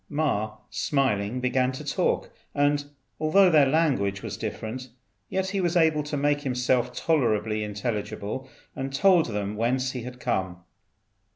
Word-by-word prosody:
Ma, 110 -8 -1 0.2
smiling, 125 -5 0
began 125 0 +1
to 130 - -7
talk; - - 0 0.2
and 145 0 +2 0.3
although 180 +5 +5
their 150 -4 +6
language 130 -11 +1
was - - -4
different, 125 +4 -5 0.4
yet 190 0 -1
he 200 -1 0
was 175 0 +1
able 160 -2 +4
to 150 0 -4
make 145 +1 +1
himself 125 -2 +1
tolerably 110 -7 +1
intelligible, 105 +3 -4 0.3
and 135 0 -4
told 185 0 +5
them 105 -2 -3
whence 125 +4 0
he 125 - -5
had 125 +1 -8
come. 95 -8 -1
130 Hz, 145 wpm, -26 LUFS, 110-150 Hz, 0.4 s, their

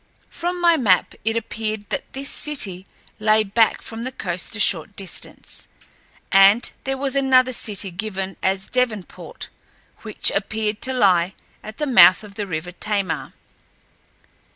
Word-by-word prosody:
From 355 +1 -3
my 340 -1 +4
map 200 - +2
it 225 +1 0
appeared 215 -2 -4
that - - -4
this 275 +1 -4
city 200 -14 -2 0.3
lay 215 0 +3
back 215 +2 +2
from 225 0 -7
the 255 - -4
coast 180 -2 -3
a - - -5
short 195 -1 +2
distance, 195 -2 -5 0.6
and 195 +4 +5
there 270 0 -1
was 275 0 -2
another 260 -2 +3
city 200 -4 -2
given 195 0 -4
as 190 0 -1
Devonport, 235 -7 -3 0.5
which 215 -2 +2
appeared 215 +1 -2
to 260 - -1
lie 185 -6 +2 0.3
at 215 0 -10
the 300 - -1
mouth 190 -7 +7
of 205 -1 -11
the 205 -1 -5
river 165 0 -4
Tamar. 200 0 -2
215 Hz, 145 wpm, -21 LUFS, 195-250 Hz, 0.6 s, mouth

